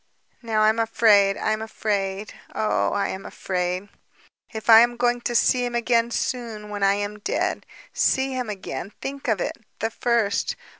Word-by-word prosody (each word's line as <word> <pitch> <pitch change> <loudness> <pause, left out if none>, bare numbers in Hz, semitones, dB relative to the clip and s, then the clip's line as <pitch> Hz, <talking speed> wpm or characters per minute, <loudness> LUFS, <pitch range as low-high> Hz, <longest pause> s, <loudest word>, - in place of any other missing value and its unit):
Now 220 -3 +1
I 215 - +6
am 220 +1 0
afraid... 210 -3 +4
am 215 0 -1
afraid... 205 -2 -3 0.2
oh, 215 - +1
I 200 -1 0
am 190 - -5
afraid. 180 +1 -3 0.6
If 220 -2 -7
I 225 -1 +10
am 240 +1 +3
going 245 0 +1
to 240 - -3
see 250 +1 +3
him 240 -1 -3
again, 235 0 +2
soon, 230 -4 -3
when 205 -1 -5
I 195 0 +4
am 205 +1 -4
dead. - - -2 0.3
See 265 0 +1
him 250 -3 -3
again... 195 -2 -6
think 275 0 -6
of 220 -5 +1
it! - - -3 0.2
The 225 +1 -2
first! 230 -4 0
220 Hz, 170 wpm, -24 LUFS, 205-235 Hz, 0.6 s, I